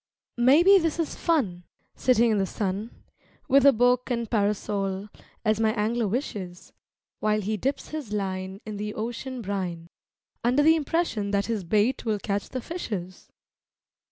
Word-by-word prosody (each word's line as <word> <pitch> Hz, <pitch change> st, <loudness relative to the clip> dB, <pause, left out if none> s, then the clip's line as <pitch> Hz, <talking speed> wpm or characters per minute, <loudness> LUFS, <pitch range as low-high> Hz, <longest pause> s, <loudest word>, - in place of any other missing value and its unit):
Maybe 330 Hz, +11 st, +7 dB
this 330 Hz, -2 st, -1 dB
is 330 Hz, -3 st, -1 dB
fun, 240 Hz, -, 0 dB, 0.3 s
sitting 240 Hz, -2 st, +3 dB
in 210 Hz, -, +2 dB
the 195 Hz, -, 0 dB
sun, 200 Hz, +3 st, -3 dB, 0.6 s
With 275 Hz, +1 st, +5 dB
a -, -, +9 dB
book 245 Hz, +1 st, +2 dB
and 235 Hz, -2 st, -1 dB
parasol, 200 Hz, -2 st, -1 dB, 0.4 s
as 215 Hz, 0 st, +2 dB
my 220 Hz, -1 st, +2 dB
Angler 225 Hz, +1 st, 0 dB
wishes, 195 Hz, -6 st, -4 dB, 0.5 s
While 215 Hz, 0 st, +1 dB
he 215 Hz, +2 st, -1 dB
dips 270 Hz, +6 st, -2 dB
his 300 Hz, -8 st, -6 dB
line 190 Hz, -1 st, -3 dB
in 215 Hz, -2 st, -5 dB
the 210 Hz, +1 st, -4 dB
ocean 240 Hz, +3 st, -5 dB
brine, 180 Hz, -4 st, -4 dB, 0.5 s
Under 250 Hz, +5 st, +3 dB
the 320 Hz, +2 st, +6 dB
impression 310 Hz, -9 st, -1 dB
that 200 Hz, 0 st, +1 dB
his 225 Hz, -4 st, -2 dB
bait 215 Hz, +8 st, +1 dB
will 220 Hz, -2 st, 0 dB
catch 200 Hz, 0 st, -3 dB
the 255 Hz, -, -4 dB
fishes. 200 Hz, -, -6 dB
215 Hz, 155 wpm, -26 LUFS, 200-255 Hz, 0.6 s, a